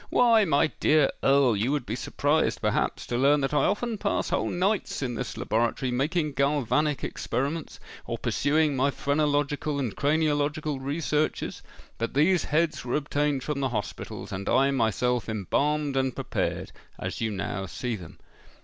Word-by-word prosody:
"Why, 230 -3 +5
my 145 -5 +3
dear 150 -2 +4
Earl, 135 -4 +4
you 110 +7 0
would 145 -4 -1
be 110 - -3
surprised, 145 +3 0
perhaps, - - 0
to 120 - -2
learn 145 +3 +4
that 135 +1 -1
I 150 - +3
often 220 +2 -1
pass 200 - -1
whole - - 0
nights 190 -3 0
in 125 -2 -2
this 125 +1 -5
laboratory, 120 +3 0
making 150 +5 0
galvanic 145 +1 +1
experiments, 140 +7 -3 0.3
or - - -2
pursuing 150 0 +1
my 135 +2 +2
phrenological 145 +1 0
and 125 -7 -2
craniological 150 -1 0
researches. 150 +1 -1 0.4
But 115 +2 -3
these 165 +4 +3
heads 160 +2 0
were 120 - -2
obtained 145 -2 0
from 150 -2 -2
the 135 -1 0
hospitals, 105 -4 -5
and 95 +1 -4
I 135 +1 +4
myself 125 -1 0
embalmed 140 - 0
and 130 -2 0
prepared, - - -2 0.3
as - - -5
you 115 - +1
now 95 -1 -3
see 120 +6 -3
them." 90 -6 -11
140 Hz, 160 wpm, -27 LUFS, 125-150 Hz, 0.4 s, Why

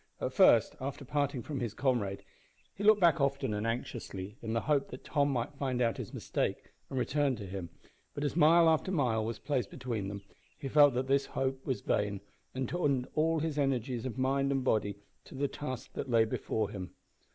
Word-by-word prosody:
At - - -2
first, - - +5
after 140 +1 -5
parting 140 -2 -1
from 145 -3 -4
his 120 -4 -3
comrade, 105 -7 0 0.5
he 200 - -6
looked 215 0 +6
back 170 -3 +5
often 140 -4 0
and 105 +2 -2
anxiously, 110 -4 -4
in 110 -1 -3
the 115 - +1
hope 145 +1 +1
that 125 - -10
Tom 145 -1 +1
might 125 +1 -2
find 135 -3 -2
out 115 -2 +1
his - - -6
mistake - - -3 0.2
and 135 - -4
return 135 +1 +1
to 105 -3 -7
him; 95 -2 -6 0.5
but 145 - -3
as 145 -1 -1
mile 165 +1 +6
after 160 +3 +2
mile 125 -10 +1
was 115 +1 -3
placed 130 -7 -1
between 120 -6 -4
them, 100 0 -6 0.3
he 135 - -5
felt 145 -1 +6
that 130 +1 0
this 135 +1 +2
hope 135 0 -2
was 130 - -1
vain, 100 -1 0 0.4
and 130 -1 -1
turned 140 -7 0
all 160 0 +2
his 155 -2 -1
energies 130 -3 0
of 125 - -6
mind 135 +1 +1
and 135 -1 0
body 105 -5 +1 0.3
to - - -12
the 140 +1 0
task 130 -3 -6
that 135 - -5
lay 115 -2 +5
before 110 -1 -2
him. 90 -3 -7
130 Hz, 205 wpm, -31 LUFS, 115-145 Hz, 0.5 s, looked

